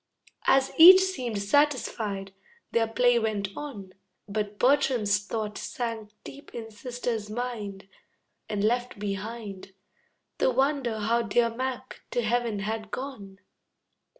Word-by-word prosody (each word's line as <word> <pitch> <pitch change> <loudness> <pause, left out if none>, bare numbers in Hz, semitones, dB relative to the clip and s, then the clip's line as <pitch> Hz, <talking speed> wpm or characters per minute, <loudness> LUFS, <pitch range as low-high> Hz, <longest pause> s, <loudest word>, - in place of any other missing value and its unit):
As 270 0 +4
each 370 +3 +11
seemed 255 - -2
satisfied, 215 -6 0 0.4
their 230 -1 +2
play 245 +1 +3
went 210 -3 -1
on. 210 -11 -7 0.3
But 205 0 -3
Bertram's 250 -6 +3
thought 215 -2 -3
sank 230 -3 -4
deep 280 +1 -12
in 225 -1 -6
sister's 235 -1 -4
mind, 215 -4 -5 0.6
And 205 -1 -1
left 245 +2 0
behind 200 -1 -6 0.6
The - - +3
wonder 265 -2 +1
how 230 +3 +2
dear 230 +1 +2
Mac 255 +1 -5
to 240 - -1
heaven 230 -2 0
had 215 +1 -3
gone. 210 -6 -7
230 Hz, 120 wpm, -27 LUFS, 210-250 Hz, 0.6 s, each